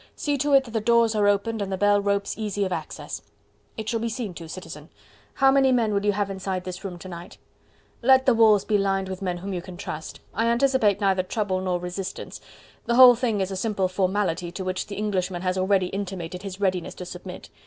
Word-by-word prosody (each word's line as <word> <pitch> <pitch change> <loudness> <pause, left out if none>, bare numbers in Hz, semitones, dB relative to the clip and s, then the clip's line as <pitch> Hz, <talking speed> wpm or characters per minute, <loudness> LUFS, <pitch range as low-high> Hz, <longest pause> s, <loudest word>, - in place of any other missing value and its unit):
See 290 -1 -1
to 290 +1 +1
it 270 -1 +6
that 240 - -11
the 225 -1 -1
doors 235 0 +3
are 210 -1 +2
opened 205 +2 +1
and 195 -1 -3
the 190 - -1
bell 205 +1 +3
ropes 200 0 -1
easy 205 -2 -2
of 185 - -4
access." - - -5 0.6
"It 220 -1 -5
shall 230 +1 0
be 230 +1 -2
seen 225 -4 -4
to, 165 -1 -9
Citizen. 160 -4 -9 0.5
How 270 0 +5
many 270 -1 +4
men 230 -4 +2
will 200 0 0
you 205 - +3
have 200 0 -1
inside 190 -1 -3
this 185 +1 -7
room 185 -3 -5
to 180 - -10
night?" 175 -1 -9 0.6
"Let 260 +1 +5
the 255 - +5
walls 220 -3 +5
be 210 -2 +2
lined 195 -1 0
with 190 0 -6
men 180 -2 -2
whom 195 +2 -5
you 180 - -3
can 180 -1 -10
trust. 160 -4 -6
I 225 +2 0
anticipate 235 -4 +2
neither 195 -2 +3
trouble 185 0 -2
nor 180 -1 -1
resistance. 180 +2 -6 0.5
The 235 - +2
whole 250 0 +10
thing 230 -4 -1
is 190 0 -2
a - - -3
simple 195 -1 0
formality 185 -2 -1
to 190 - -5
which 185 0 -3
the 200 - -6
Englishman 190 -4 -2
has 185 0 0
already 190 0 +2
intimated 185 -3 -5
his 195 -1 -7
readiness 185 -3 -1
to 180 - -7
submit. 180 +1 -9
195 Hz, 230 wpm, -25 LUFS, 185-220 Hz, 0.6 s, whole